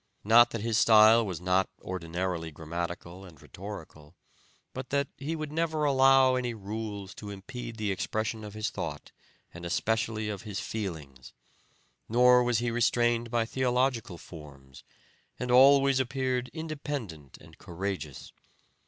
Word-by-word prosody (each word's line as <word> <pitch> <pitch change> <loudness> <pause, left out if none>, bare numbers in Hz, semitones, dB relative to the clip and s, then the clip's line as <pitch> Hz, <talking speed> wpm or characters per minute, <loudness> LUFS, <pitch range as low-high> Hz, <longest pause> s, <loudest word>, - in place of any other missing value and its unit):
Not 115 +3 +6
that 115 - -5
his 115 0 +1
style 110 +1 +7
was 95 -6 -4
not 90 +1 +1
ordinarily 85 -1 -4
grammatical 85 +3 -6
and 85 -6 -14
rhetorical, 90 -5 -10 0.6
but 130 -1 -6
that 140 0 0
he 150 +4 -4
would 155 -2 -5
never 160 -1 -1
allow 135 -1 +5
any 125 -2 -1
rules 105 -1 -6
to 105 - -9
impede 115 +4 -7
the 105 -2 -1
expression 110 +3 -3
of 105 0 -9
his 110 0 -2
thought 75 -3 -6 0.4
and 85 - -10
especially 110 +4 -1
of 100 -3 -4
his 105 -3 -5
feelings, 75 - -6 0.8
nor 125 +2 +6
was 120 -2 +1
he 120 +1 -1
restrained 120 0 +1
by 115 -1 +1
theological 125 -5 0
forms, 70 -6 -13 0.6
and 125 0 -2
always 135 +1 +6
appeared 130 -1 -1
independent 145 - -6
and 80 0 -17
courageous. 90 -5 -6
110 Hz, 135 wpm, -29 LUFS, 90-125 Hz, 0.8 s, style